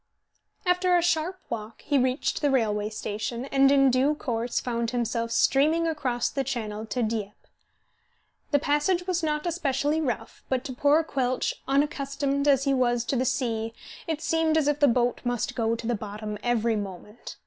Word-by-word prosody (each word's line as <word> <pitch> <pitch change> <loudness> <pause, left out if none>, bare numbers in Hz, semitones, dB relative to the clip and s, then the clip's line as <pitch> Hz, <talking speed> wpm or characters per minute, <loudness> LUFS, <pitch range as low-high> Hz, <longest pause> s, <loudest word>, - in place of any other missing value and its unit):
After 360 0 +3
a - - +3
sharp 350 +2 0
walk 220 -1 -6
he 285 -2 +2
reached 255 +2 0
the 290 - +2
railway 215 -5 +1
station, 215 +3 -4
and 275 0 +4
in 275 -1 +5
due 265 +4 +2
course 240 -4 -2
found 235 -2 -2
himself 235 -1 -1
steaming 305 +7 +3
across 260 -7 -1
the 275 - -1
Channel 220 -5 -4
to 235 +3 -1
Dieppe. 215 -2 -2 1.2
The 290 - +4
passage 295 +6 +1
was 360 -2 0
not 300 -1 -1
especially 310 -2 0
rough, 250 -7 -4
but 260 -1 0
to 260 - -5
poor 290 +5 +3
Quelch, 255 -4 -1
unaccustomed 280 0 0
as 275 -2 +4
he 275 -1 +2
was 240 -2 +1
to - - -1
the 255 +1 +1
sea, 230 -4 -1 0.3
it 320 -2 -3
seemed 325 -1 +2
as 305 -2 +2
if 295 0 +1
the 290 - +5
boat 240 -1 +1
must 245 -2 -1
go 230 -1 0
to 230 - -7
the 240 - +1
bottom 210 -1 -5
every 235 -2 +1
moment. 205 +2 -7
260 Hz, 175 wpm, -26 LUFS, 230-295 Hz, 1.2 s, in